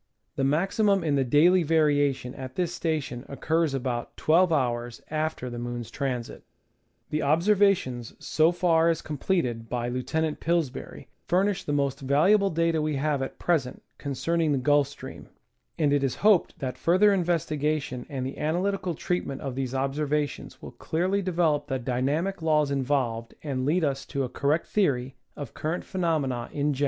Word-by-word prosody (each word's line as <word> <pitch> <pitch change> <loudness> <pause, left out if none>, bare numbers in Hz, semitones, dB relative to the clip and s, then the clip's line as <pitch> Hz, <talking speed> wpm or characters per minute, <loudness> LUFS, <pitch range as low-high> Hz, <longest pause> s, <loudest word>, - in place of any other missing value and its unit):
The 135 - -1
maximum 195 - +2
in 155 -3 +1
the 140 -1 +2
daily 165 +8 +5
variation 145 -5 +2
at 130 -1 -8
this 175 -1 -1
station 150 -7 -2
occurs 155 +2 0
about 125 -2 -3
1 170 +4 +4
2^ 120 -6 -1
after 155 -4 -2
the 120 -1 -5
moon's 120 -1 -5
transit. 125 -4 -4 0.7
The 155 - 0
observations 165 - +2
so 160 +2 +2
far 170 -2 +3
as 165 - -1
completed 135 - -1
by 120 0 -2
Lieutenant 150 +5 -2
Pillsbury 165 -5 -2 0.2
furnish 190 +2 +1
the - - -3
most 140 -1 0
valuable 170 +10 +3
data 165 -1 +1
we 155 -1 -1
have 145 0 0
at 135 - -5
present 150 -8 -1 0.2
concerning 155 +3 0
the - - +1
Gulf 145 +1 +3
Stream, 140 - -10 0.5
and 145 -3 +2
it 145 -1 +2
is 135 - 0
hoped 210 -5 +4
that 130 -3 -5
further 190 +5 +4
investigation 155 -7 -1
and 135 -3 -3
the 135 - -6
analytical 180 +3 -1
treatment 145 -5 -3
of 135 -2 -4
these 130 0 -3
observations 145 +2 -2
will - - -7
clearly 185 +5 -1
develop 165 -5 +1
the 135 -2 -1
dynamic 140 +10 -1
laws 150 -3 +2
involved 130 -4 -1
and 135 -3 -2
lead 170 +3 +2
us 135 -2 -1
to 140 - -2
a 125 - -3
correct 145 +6 0
theory 135 -10 0 0.2
of 140 -5 -7
cur 155 +2 -2
rent 175 - -4
phenomena 150 -10 -1
in 145 0 0
general. 135 - -7
150 Hz, 165 wpm, -26 LUFS, 130-170 Hz, 0.7 s, daily